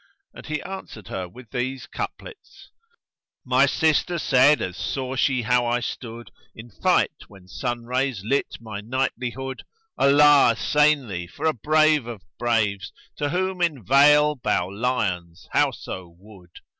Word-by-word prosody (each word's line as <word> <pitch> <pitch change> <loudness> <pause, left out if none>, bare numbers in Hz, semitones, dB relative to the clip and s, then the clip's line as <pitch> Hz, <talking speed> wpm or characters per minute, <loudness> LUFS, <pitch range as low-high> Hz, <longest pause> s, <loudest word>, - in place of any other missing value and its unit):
And - - -12
he 155 -1 -3
answered 180 - -9
her 90 -1 -5
with 120 +4 -15
these 130 +1 -3
couplets, 450 -4 -9 0.7
"My 130 +2 +4
sister 160 +4 +1
said, 145 -1 +4
as 90 - -4
saw 130 +6 -3
she 130 -2 +1
how 125 +1 +2
I 120 +1 +1
stood 120 -1 -7
* - - -33
In 115 +1 -12
fight, 95 - +2 0.2
when 95 -3 -17
sun 120 +4 -4
rays 125 -4 -1
lit 140 +5 -1
my 110 -3 -7
knightlihood 130 +2 -3 0.4
'Allah 145 +1 +6
assain 150 -3 +2
thee 90 -3 -5
for 90 - -7
a 160 - +3
Brave 155 +1 +2
of 115 -6 -8 0.2
braves 105 -5 0
* - - -36
To 145 -1 -1
whom 185 +2 -2
in 150 - -1
vale 150 +3 +5
bow 95 -9 -1
lions 95 -6 -2
howso 90 -2 -2
wood!' 95 -2 -17
125 Hz, 150 wpm, -23 LUFS, 105-145 Hz, 0.7 s, Allah